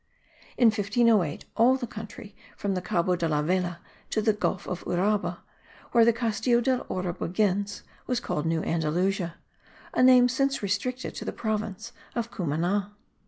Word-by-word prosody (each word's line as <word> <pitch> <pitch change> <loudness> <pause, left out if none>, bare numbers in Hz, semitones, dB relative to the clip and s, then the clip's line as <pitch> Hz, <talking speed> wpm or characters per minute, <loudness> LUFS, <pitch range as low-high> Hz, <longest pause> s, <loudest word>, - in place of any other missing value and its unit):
In 240 -3 +6
1508 215 - +2
all 240 +3 +5
the 255 - -4
country 215 -1 -9 0.2
from 200 -1 -1
the 185 - -2
Cabo 180 0 +1
de 170 -1 -1
la 150 -1 +1
Vela 175 +1 -1 0.3
to - - 0
the 215 0 +3
Gulf 205 -2 -2
of 180 - -4
Uraba, 200 +4 0 0.5
where 235 - +6
the 235 - +6
Castillo 230 +1 +1
del 250 +1 +1
Oro 185 -1 -2
begins, 200 +3 -1 0.2
was 250 -1 0
called 150 -7 -2
New 165 0 0
Andalusia, 170 +3 0 0.6
a - - +2
name 255 -1 +7
since 275 0 0
restricted 230 +6 -2
to - - -6
the - - -2
province 220 0 -3 0.2
of 235 -1 -2
Cumana. 180 +5 -1
205 Hz, 160 wpm, -27 LUFS, 180-235 Hz, 0.6 s, name